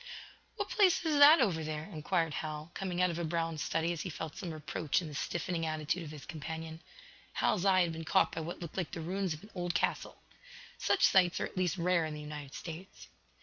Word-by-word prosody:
"What 405 Hz, -2 st, -3 dB
place 380 Hz, -5 st, +4 dB
is 305 Hz, -2 st, +2 dB
that 300 Hz, +3 st, +10 dB
over 175 Hz, -9 st, +1 dB
there?" 155 Hz, 0 st, -3 dB
inquired 165 Hz, -1 st, -1 dB
Hal, 155 Hz, +1 st, -5 dB
coming 180 Hz, -2 st, -1 dB
out 180 Hz, -, +3 dB
of 170 Hz, -, -4 dB
a -, -, -1 dB
brown 165 Hz, -1 st, -1 dB
study 165 Hz, +3 st, 0 dB
as 165 Hz, -, -4 dB
he 185 Hz, -, -4 dB
felt 160 Hz, -2 st, -6 dB
some 180 Hz, -, -5 dB
reproach 155 Hz, -1 st, -1 dB
in 175 Hz, -, -5 dB
the 150 Hz, -, -8 dB
stiffening 170 Hz, +3 st, -2 dB
attitude 155 Hz, +2 st, -1 dB
of 160 Hz, -, -7 dB
his 150 Hz, -2 st, -9 dB
companion. 160 Hz, 0 st, -6 dB, 0.5 s
Hal's 200 Hz, -3 st, +1 dB
eye 190 Hz, -1 st, +5 dB
had 170 Hz, -2 st, +1 dB
been 165 Hz, 0 st, -5 dB
caught 155 Hz, -, +3 dB
by 165 Hz, -, -4 dB
what 165 Hz, +2 st, -5 dB
looked 170 Hz, -, -8 dB
like 180 Hz, -4 st, -2 dB
the -, -, -4 dB
ruins 185 Hz, 0 st, -1 dB
of 155 Hz, -, -14 dB
an 210 Hz, -, -14 dB
old 175 Hz, -1 st, -2 dB
castle. -, -, 0 dB, 0.6 s
Such -, -, +3 dB
sights 185 Hz, -2 st, +4 dB
are -, -, 0 dB
at -, -, -10 dB
least 185 Hz, 0 st, 0 dB
rare 170 Hz, -1 st, +2 dB
in 155 Hz, -, -5 dB
the -, -, -7 dB
United 150 Hz, -2 st, -7 dB
States. 170 Hz, +3 st, -9 dB
165 Hz, 230 wpm, -32 LUFS, 155-185 Hz, 0.6 s, that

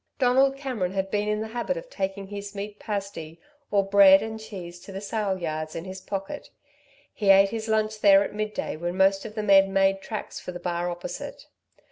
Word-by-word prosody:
Donald 265 Hz, +1 st, +3 dB
Cameron 240 Hz, -10 st, -3 dB
had 195 Hz, 0 st, -2 dB
been 210 Hz, 0 st, 0 dB
in 210 Hz, 0 st, 0 dB
the 220 Hz, -, -4 dB
habit 245 Hz, -, -2 dB
of -, -, -7 dB
taking 195 Hz, -, -4 dB
his 200 Hz, +1 st, -7 dB
meat 205 Hz, +1 st, -6 dB
pasty, 195 Hz, -6 st, -5 dB, 0.3 s
or 200 Hz, -1 st, +2 dB
bread 195 Hz, 0 st, +7 dB
and 220 Hz, 0 st, -5 dB
cheese 195 Hz, -6 st, -8 dB
sandwich 175 Hz, -, -16 dB
to -, -, -8 dB
the 190 Hz, -, -4 dB
sale 205 Hz, -1 st, -2 dB
yards 155 Hz, -2 st, -4 dB
in 165 Hz, -, -5 dB
his 190 Hz, 0 st, -8 dB
pocket. 195 Hz, +10 st, -5 dB, 0.6 s
He 205 Hz, -3 st, -1 dB
ate 195 Hz, 0 st, +7 dB
his 225 Hz, 0 st, -4 dB
lunch 215 Hz, 0 st, 0 dB
there 200 Hz, -1 st, +7 dB
at -, -, -6 dB
midday 215 Hz, 0 st, -3 dB
when 175 Hz, +3 st, -3 dB
most 195 Hz, 0 st, +3 dB
of 215 Hz, -1 st, -8 dB
the 215 Hz, -, -2 dB
men 195 Hz, -1 st, +5 dB
made 195 Hz, 0 st, +2 dB
tracks 215 Hz, +2 st, -6 dB
for -, -, -7 dB
the 175 Hz, -, -7 dB
bar 175 Hz, 0 st, -2 dB
opposite. 175 Hz, +1 st, -7 dB
200 Hz, 210 wpm, -26 LUFS, 190-215 Hz, 0.6 s, bread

